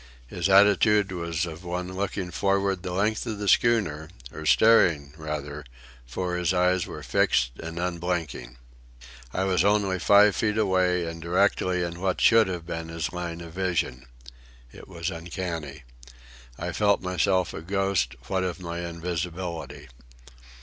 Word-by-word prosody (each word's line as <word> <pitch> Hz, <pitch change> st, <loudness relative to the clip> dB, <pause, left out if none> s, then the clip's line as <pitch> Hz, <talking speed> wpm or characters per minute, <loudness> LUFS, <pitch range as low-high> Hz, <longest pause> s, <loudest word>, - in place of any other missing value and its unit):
His 85 Hz, +9 st, -2 dB
attitude 100 Hz, +1 st, +5 dB
was 85 Hz, -2 st, -2 dB
of 85 Hz, +1 st, -8 dB
one 90 Hz, +1 st, -4 dB
looking 95 Hz, -1 st, -3 dB
forward 95 Hz, +1 st, 0 dB
the 90 Hz, -1 st, -5 dB
length 105 Hz, +4 st, 0 dB
of 110 Hz, -2 st, -3 dB
the 100 Hz, 0 st, -4 dB
schooner, 95 Hz, -9 st, +2 dB, 0.2 s
or 80 Hz, 0 st, -6 dB
staring, 80 Hz, -9 st, +4 dB
rather, 75 Hz, -2 st, -5 dB, 0.4 s
for 90 Hz, +8 st, -3 dB
his 90 Hz, +1 st, 0 dB
eyes 90 Hz, 0 st, +2 dB
were -, -, -8 dB
fixed -, -, +2 dB
and 80 Hz, +1 st, -7 dB
unblinking. 85 Hz, -8 st, -3 dB, 0.7 s
I 95 Hz, -, -1 dB
was 95 Hz, -2 st, +2 dB
only 100 Hz, -2 st, +2 dB
five 100 Hz, +3 st, +5 dB
feet 105 Hz, +3 st, 0 dB
away 95 Hz, -4 st, +2 dB
and 80 Hz, 0 st, -6 dB
directly 90 Hz, +1 st, +1 dB
in 85 Hz, 0 st, -5 dB
what 95 Hz, 0 st, -1 dB
should 115 Hz, -2 st, +5 dB
have 90 Hz, -3 st, -5 dB
been 80 Hz, -1 st, -5 dB
his 80 Hz, -1 st, -4 dB
line 85 Hz, -1 st, -5 dB
of 85 Hz, -1 st, -10 dB
vision. 85 Hz, -9 st, -2 dB, 0.6 s
It -, -, -13 dB
was 85 Hz, 0 st, -4 dB
uncanny. 85 Hz, -4 st, -6 dB, 0.7 s
I 85 Hz, +1 st, -4 dB
felt 100 Hz, +3 st, +2 dB
myself 90 Hz, 0 st, +1 dB
a -, -, -6 dB
ghost, 95 Hz, -8 st, 0 dB
what 95 Hz, +4 st, 0 dB
of 90 Hz, 0 st, -3 dB
my 85 Hz, -1 st, -5 dB
invisibility. 85 Hz, -2 st, -5 dB
90 Hz, 150 wpm, -26 LUFS, 85-95 Hz, 0.7 s, attitude